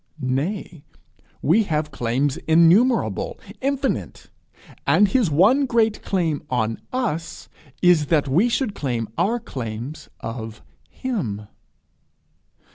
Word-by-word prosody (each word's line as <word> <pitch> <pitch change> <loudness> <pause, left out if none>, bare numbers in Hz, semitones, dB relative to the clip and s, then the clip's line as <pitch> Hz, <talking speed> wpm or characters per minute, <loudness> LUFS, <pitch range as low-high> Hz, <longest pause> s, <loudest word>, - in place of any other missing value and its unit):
Nay, 145 +5 -3 0.6
we 185 +9 +4
have 150 -3 -1
claims 130 +3 0
innumerable, 175 +10 +3 0.2
infinite; 275 0 -2 0.6
and 205 - +5
his 215 -2 +2
one 215 - +4
great 225 -3 +1
claim 165 -6 -1
on 115 -3 -1
us 225 -11 -3 0.4
is 175 -5 +5
that 150 -3 +2
we 175 - +3
should 235 -3 0
claim 120 - -2
our 235 +5 +1
claims 130 - -6
of 115 -1 -7 0.3
him. 135 - -4
165 Hz, 105 wpm, -22 LUFS, -, 0.6 s, and